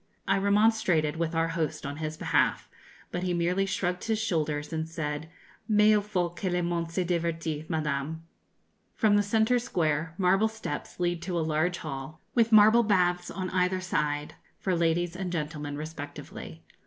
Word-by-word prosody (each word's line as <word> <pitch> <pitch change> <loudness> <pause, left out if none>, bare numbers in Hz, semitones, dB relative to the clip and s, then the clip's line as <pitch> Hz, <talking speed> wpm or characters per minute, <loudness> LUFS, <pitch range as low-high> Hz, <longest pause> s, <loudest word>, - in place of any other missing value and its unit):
I 195 +1 +3
remonstrated 200 -6 +3
with 165 0 -1
our 165 0 +2
host 160 -2 -2
on 145 +1 -4
his 155 0 -4
behalf; - - +1 0.4
but 175 - -2
he 180 -1 0
merely 180 +3 +1
shrugged 180 -2 -2
his 220 -1 +1
shoulders 155 -8 -1
and 160 0 -2
said, 155 -1 -4 0.4
'Mais 210 -1 +5
il 210 - +3
faut 180 -4 -2
que 185 +1 -2
le 180 0 0
monde 170 -1 -1
se 180 +2 -1
divertisse, 165 -3 -2
Madame.' 155 -1 -2 0.7
From 215 -2 +3
the 205 - +5
centre 220 +4 +2
square, 160 -7 -1
marble 195 +3 +3
steps 220 -9 -6
lead 175 -1 0
to 175 0 -3
a - - +1
large 160 +3 +1
hall, 155 +1 -6
with 230 -1 +3
marble 220 +2 +7
baths 180 -5 +2
on 185 -1 -4
either 185 0 +1
side, 150 -5 -1 0.2
for 185 -2 0
ladies 170 +1 +1
and 185 -1 -3
gentlemen 150 -3 -3
respectively. 145 - -8
175 Hz, 165 wpm, -28 LUFS, 155-190 Hz, 0.7 s, marble